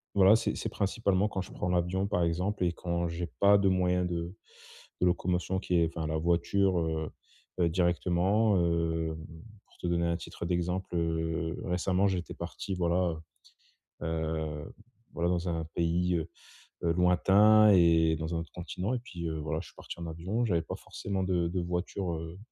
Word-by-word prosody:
voilà, 100 +2 +7
c'est 110 - 0
c'est - - -3
principalement 100 0 0
quand 95 - -4
je - - -9
prends 90 - -2
l'avion, 90 +2 +1
par 90 -4 +1
exemple 90 +3 0
et 85 - 0
quand 85 0 -2
j'ai 85 +1 -4
pas 100 0 +6
de 100 -1 +3
moyens 90 -1 +2
de 85 +2 -4 0.7
de 90 - +4
locomotion 90 +1 0
qui 90 - -1
est 85 -1 +4
enfin, 80 -2 -2
la 80 0 -1
voiture, 85 +3 +2
heu 80 -1 -2 0.5
heu, 85 -2 +3
directement. 90 +4 +2
Heu, 80 -2 0 0.5
pour - - -26
te - - -3
donner 85 0 +1
un 85 0 0
titre 85 - -7
d'exemple, 90 +1 -2
heu, 80 -1 -1
récemment, 90 +2 +1
j'étais 90 -3 -2
parti 95 - -5
voilà, 85 -2 0 0.8
heu - - -3
heu, 80 -2 -3 0.4
voilà, 85 +1 0
dans 90 0 -1
un 85 -1 -1
pays, 85 +1 +1
heu 80 0 -4 0.5
heu, 85 -1 +2
lointain 100 +5 +5
et 80 -3 +5
dans 80 +2 -4
un - - 0
autre 85 - -7
continent 90 +5 -3
et 125 - 0
puis, 90 -9 -6
heu, 80 -1 -3
voilà, 80 +1 -2
je - - -11
suis - - -18
parti - - -9
en 85 - -5
avion 95 +9 -2
j'avais 85 -6 +1
pas - - -5
forcément 95 -1 -4
de 90 -2 +1
de 90 +2 -2
voiture, 90 +1 -2
heu 80 +2 -7
85 Hz, 185 wpm, -30 LUFS, 85-95 Hz, 0.8 s, voilà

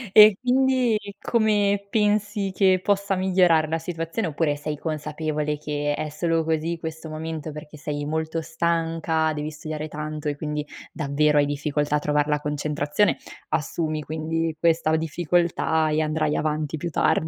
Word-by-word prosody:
E 210 -2 +9
quindi 255 -2 +3 0.2
come 205 -3 +2
pensi 210 -2 +1
che 185 -2 +4
possa 200 -1 +1
migliorare 180 -4 +3
la 165 +1 0
situazione 165 +3 -3
oppure 145 -1 0
sei 150 +1 -4
consapevole 150 -1 -2
che 145 0 -2
è 155 - -3
solo 165 +2 0
così 160 +1 -1
questo 160 0 -6
momento 155 0 -5
perché 150 0 -10
sei 145 0 -4
molto 160 +2 -2
stanca, 165 -1 0
devi 150 +1 -3
studiare 155 0 -5
tanto 150 0 -5
e 145 - -1
quindi 150 0 -3 0.3
davvero 150 0 +2
hai 145 - +4
difficoltà 145 0 0
a - - +3
trovar 150 0 +1
la 150 0 +1
concentrazione? 150 +5 0 0.3
Assumi 155 0 -1
quindi 160 +1 -2
questa 165 -1 +2
difficoltà 160 0 +1
e 155 - +1
andrai 155 -1 0
avanti 155 0 -1
più 170 +3 -4
tardi. - - +2
160 Hz, 150 wpm, -24 LUFS, 150-170 Hz, 0.3 s, E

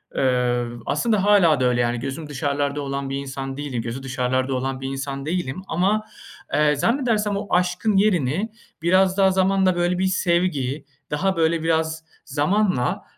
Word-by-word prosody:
Iıı, 120 -2 0
aslında 205 +6 +1
hâlâ 180 -9 +5
da 130 - +2
öyle. 120 -1 +2
Yani 120 0 0
gözüm 140 +4 -5
dışarılarda 145 +1 -1
olan 140 0 -3
bir 135 - -3
insan 135 -1 -5
değilim 140 -5 -3
gözü 120 +3 -5
dışarılarda 130 +1 -1
olan 130 +1 -3
bir 135 - -3
insan 135 0 -4
değilim. 170 -1 -2
Ama, 200 +6 +1 0.5
eee, 150 0 +3
zannedersem 215 - +1
o 205 - -5
aşkın 180 +4 +1
yerini 195 - +1 0.3
biraz 185 +2 +3
daha 190 -1 +5
zamanla 190 0 +2
böyle 175 +1 0
bir 190 - +2
sevgi, 170 -7 0 0.3
daha 190 +5 0
böyle 165 0 +1
biraz 160 0 0 0.2
zamanla, 150 -1 0
150 Hz, 155 wpm, -22 LUFS, 135-185 Hz, 0.5 s, hâlâ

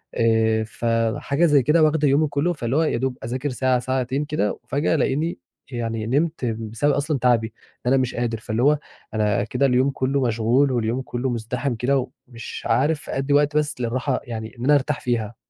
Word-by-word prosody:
آآ، 110 -1 +2
فحاجة 115 +7 0
زي 145 -5 +4
كده 155 +3 +4
واخدة 155 -1 +3
يومي 145 +3 +3
كُلّه 145 +5 0
فاللي 125 -3 -3
هو 160 - +3
يا 150 - 0
دوب 130 0 -2
أذاكر 130 +5 -3
ساعة 130 0 +1
ساعتين 130 +3 -1
كده، 145 -9 -1
وفجأة 145 +6 0
ألاقيني 150 +4 0 0.3
يعني 115 -2 -3
نِمت 150 +1 0
بسبب 115 +5 -1
أصلًا 145 -1 -1
تعبي 120 -2 +3 0.4
إن - - +3
أنا - - +5
مش 130 - -2
قادر، 120 -2 -1
فاللي 110 +2 -2
هو 150 +1 +5 0.4
أنا 105 -2 +1
كده 130 +5 0
اليوم 130 +1 +3
كُلّه 135 +1 0
مشغول، 120 +5 +2
واليوم 120 +1 0
كُلّه 125 +1 -3
مزدحم 120 +2 -2
كده 130 +2 0 0.2
ومش 120 -2 -8
عارف 145 +3 +1
أدّي 135 +2 -1
وقت 145 +1 +3
بس 150 -4 -1
للراحة 125 +3 -1
يعني 110 -1 -6
إن - - -5
أنا 145 +1 +5
أرتاح 140 +1 0
فيها. 115 -2 -2
130 Hz, 185 wpm, -23 LUFS, 115-145 Hz, 0.4 s, أنا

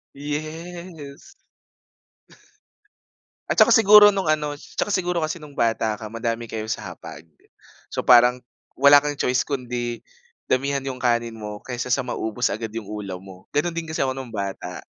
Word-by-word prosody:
Yes. 155 - -7 2.2
At - - 0
saka - - +7
siguro 210 -2 +8
no'ng 195 -5 -1
ano 150 -1 0
'tsaka 200 +7 -4
siguro 175 -3 0
kasi 160 +1 -5
nung 145 -2 -13
bata 110 -2 +1
ka 110 - -9
madami 115 +1 -3
kayo 110 -1 -5
sa - - -4
hapag. - - -11 0.6
So - - -4
parang 125 0 +5 0.3
wala 140 +1 +7
kang 145 -1 -3
choice 125 -2 +1
kundi 120 -3 -4 0.4
damihan 135 +1 0
'yong 130 -1 -5
kanin 120 -2 +1
mo 105 -1 -7
kaysa 125 0 -4
sa 125 0 +1
maubos 110 -3 -2
agad 110 0 -5
'yong 110 -1 -6
ulam 100 -3 -6
mo. 95 -1 -14
Gano'n 165 +4 0
din 165 -1 -5
kasi 160 -3 0
ako 130 - -1
no'ng 130 -2 -7
bata, 100 -4 -5
130 Hz, 155 wpm, -23 LUFS, 115-155 Hz, 2.2 s, siguro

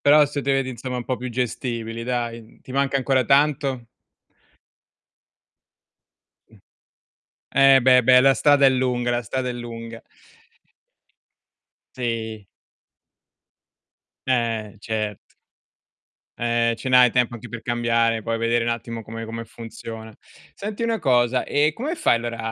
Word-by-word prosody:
Però 150 +1 +6
se 145 0 -4
te 140 - 0
vedi 135 -1 0
insomma 125 +1 -5
un 120 - -4
po' 130 - -2
più 125 +2 -6
gestibili, 115 -1 -3
dai. 120 -2 -4
Ti 130 - -11
manca 140 0 +1
ancora 130 -1 +1
tanto? 140 -3 +1 2.6
Mh. - - -19 1.0
Eh, 135 0 +6
beh, 125 -1 +5
beh, 125 +1 +6
la 135 0 +5
strada 145 0 +4
è - - +7
lunga, 125 -2 0
la 120 0 0
strada 125 +3 -3
è - - -1
lunga. 115 -1 -8 2.0
Sì. 110 -4 -4 1.8
Eh, 115 -4 -1
cert 110 -2 -3 1.2
Eh, 115 0 +1
ce 125 +3 -5
n'hai 125 -1 +6
tempo 125 -1 +1
anche 120 +1 -9
per 115 +1 -8
cambiare, 115 -1 +1
poi 115 +1 -2
vedere 115 +1 +1
un 120 - 0
attimo 115 0 -5
come 115 +1 -7
come 115 +1 -6
funziona. 115 -1 -9 0.4
Senti 210 +2 -6
una 230 -1 0
cosa: 125 -4 +2
ehm, 150 +2 +2
come 285 - -4
fai 310 - +2
allora 115 0 -5
120 Hz, 135 wpm, -23 LUFS, 115-130 Hz, 2.6 s, è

